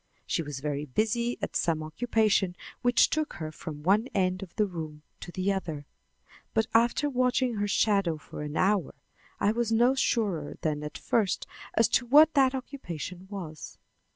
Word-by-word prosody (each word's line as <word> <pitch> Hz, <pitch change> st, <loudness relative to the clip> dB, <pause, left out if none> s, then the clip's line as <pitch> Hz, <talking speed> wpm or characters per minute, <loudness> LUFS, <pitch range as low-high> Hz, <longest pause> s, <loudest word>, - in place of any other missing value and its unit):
She -, -, 0 dB
was 145 Hz, -3 st, -6 dB, 0.3 s
busy 235 Hz, +3 st, +1 dB
at -, -, -3 dB
some 160 Hz, -2 st, +1 dB
occupation 200 Hz, +1 st, +1 dB, 0.3 s
which 245 Hz, -1 st, +4 dB
took 310 Hz, -1 st, -1 dB
her 155 Hz, -2 st, -5 dB
from 150 Hz, -1 st, -8 dB
one 205 Hz, +7 st, +3 dB
end 185 Hz, -1 st, +1 dB
of 185 Hz, -3 st, -9 dB
the 210 Hz, -, +3 dB
room 160 Hz, -5 st, -7 dB, 0.2 s
to 175 Hz, -, -8 dB
the 190 Hz, +2 st, 0 dB
other; 160 Hz, -7 st, -4 dB, 0.7 s
but 220 Hz, -, +3 dB
after 235 Hz, +5 st, +3 dB
watching 255 Hz, -3 st, +1 dB
her 205 Hz, 0 st, 0 dB
shadow 195 Hz, -5 st, +2 dB
for 125 Hz, -1 st, -9 dB
an 150 Hz, +1 st, -4 dB
hour 195 Hz, -4 st, +1 dB, 0.4 s
I 205 Hz, -, +3 dB
was 230 Hz, 0 st, -1 dB
no 240 Hz, +3 st, +4 dB
surer 205 Hz, -, 0 dB
than 150 Hz, -2 st, -1 dB
at 150 Hz, 0 st, -6 dB
first 210 Hz, -5 st, 0 dB, 0.3 s
as 225 Hz, -, +5 dB
to 245 Hz, -, +1 dB
what 300 Hz, +5 st, +7 dB
that 270 Hz, -2 st, +4 dB
occupation 185 Hz, -, -6 dB
was. 170 Hz, -7 st, -7 dB
200 Hz, 165 wpm, -28 LUFS, 160-235 Hz, 0.7 s, what